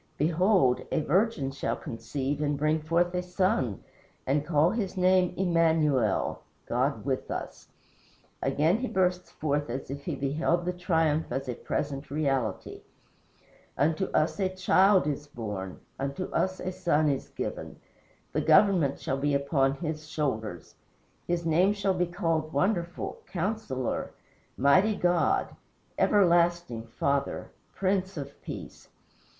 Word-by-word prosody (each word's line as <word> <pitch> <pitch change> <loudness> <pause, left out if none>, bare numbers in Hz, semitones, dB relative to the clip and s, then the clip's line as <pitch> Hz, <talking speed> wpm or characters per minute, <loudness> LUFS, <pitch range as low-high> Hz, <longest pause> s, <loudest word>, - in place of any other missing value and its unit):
Behold, 165 -3 +3
a - - +1
virgin 170 -4 +1
shall 135 - -2
conceive 135 +5 -4
and 145 -1 0
bring 155 +2 +1
forth 170 +3 +1
a 180 - 0
son 180 - 0 0.4
and 140 +3 +2
shall - - -13
call 155 +2 +4
his 205 -4 -3
name 185 -1 +4
Immanuel 160 - +2 0.2
[God - - -1
with - - -2
us]." - - -6 0.7
Again 150 +7 +2
he 255 - -2
bursts 180 -3 0
forth 145 -2 -2
as 130 +2 -5
if 140 0 -7
he - - -2
beheld 160 +5 0
the 180 - -1
triumph 160 -3 +1
as 135 +2 -3
a 125 - -2
present 140 +3 -4
reality: 135 -8 -2 1.0
"Unto 155 +7 +2
us 155 +4 0
a 190 -1 +1
child 185 0 +4
is 145 0 -3
born 105 -8 -6 0.2
Unto 140 +6 -3
us 185 0 0
a 185 - -3
son 155 -4 +1
is 140 -2 -1
given. - - -5 0.6
The - - +1
government 180 -9 +4
shall 135 - -2
be 145 0 +1
upon 140 -1 +2
his 155 -1 -5
shoulders. 110 - -3 0.5
His 175 -1 -1
name 175 +5 +3
shall 200 -2 0
be 180 -1 0
called 165 -3 -1
Wonderful, 175 +2 -1
Counsellor, 180 - -3 0.4
Mighty 185 - +4
God, 175 -3 +1 0.4
Everlasting 175 - +3
Father, 140 +4 -1 0.2
Prince 190 -1 0
of 140 -1 -7
Peace. - - -9
155 Hz, 135 wpm, -28 LUFS, 140-180 Hz, 1.0 s, call